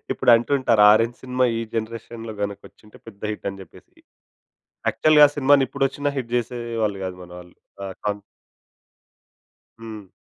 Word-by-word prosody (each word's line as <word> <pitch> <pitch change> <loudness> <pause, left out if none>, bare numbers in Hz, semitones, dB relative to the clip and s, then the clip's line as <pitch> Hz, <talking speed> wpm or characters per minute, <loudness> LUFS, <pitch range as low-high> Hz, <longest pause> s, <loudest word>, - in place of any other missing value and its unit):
ఇప్పుడు - - +2
అంటుంటారు 120 -2 +2
orange 115 +2 +1
cinema 130 0 0
ఈ - - -2
జనరేషన్‌లో 115 0 -5
గనుకొచ్చింటే 100 +1 -8
పెద్ద 100 -3 -13
హిట్ 105 - -6
అని 95 0 -11
చెప్పేసి. 90 - -18 0.9
యాక్చువల్‌గా 150 -1 +6
ఆ - - -11
సినిమాని 140 0 +4
ఇప్పుడొచ్చినా 140 +1 -1
హిట్ 125 -3 -4
చేసేవాళ్లు 115 -3 -2
కాదు 95 -1 -5
మన 90 - -13
వాళ్లు. 90 0 -15 0.3
ఆ - - -4 0.2
కాన్ 105 -1 -2 1.6
హ్మ్. 110 -4 -10
115 Hz, 135 wpm, -22 LUFS, 105-130 Hz, 1.6 s, యాక్చువల్‌గా